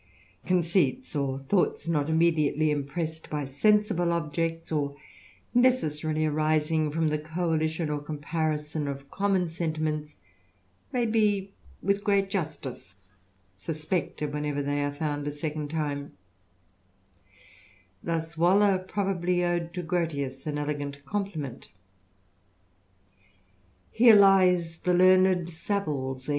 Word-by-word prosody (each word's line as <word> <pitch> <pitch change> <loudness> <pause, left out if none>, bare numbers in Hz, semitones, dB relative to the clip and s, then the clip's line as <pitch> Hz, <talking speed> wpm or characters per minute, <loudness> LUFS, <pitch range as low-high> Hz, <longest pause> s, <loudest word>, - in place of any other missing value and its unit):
Conceits, 175 - +1
or 135 -2 -1
thoughts 165 +4 0
not 150 -3 0
immediately 160 -2 +2
impressed 155 +3 -3
\^^ 145 -2 -3
sensible 205 +3 +2
objects, 165 0 -2
or 145 -2 -1 0.6
necessarily 155 -12 +2
arising 155 +1 +1
from 160 +1 0
the 150 0 -1
coalition 160 0 -1
<^:^^ 150 -1 -1
^^. - - -13
comparison 150 0 -2
of 140 0 -6
common 195 -3 +1
sentiments, 155 -2 -3 0.8
may 245 -2 +1
be 205 -3 +1 0.3
with 200 +1 +1
gres^^^ 200 -1 +2
justice 150 - -5 0.6
suspected 155 - -3
whenever 150 -1 -2
they 145 +1 -1
are 145 - -1
found 145 0 -3
a - - -1
second 150 0 -4
tiixM^^^ 145 -2 -3 1.9
Thus 165 0 -3
Waller 190 +3 +4
probably 185 -2 -1
owed 175 -1 -1
to 180 - -3
Grotius 155 -6 -2
an 150 -1 -2
elegant 145 -1 -4
coi 205 +6 -1
pliment: 150 - -6
•* - - -16 2.2
Here 230 -1 +7
lies 185 -4 +5
the 180 0 +1
learned 185 -1 +5
SaviVs 150 -8 -3
heir. - - -6
160 Hz, 115 wpm, -27 LUFS, 150-180 Hz, 2.2 s, Here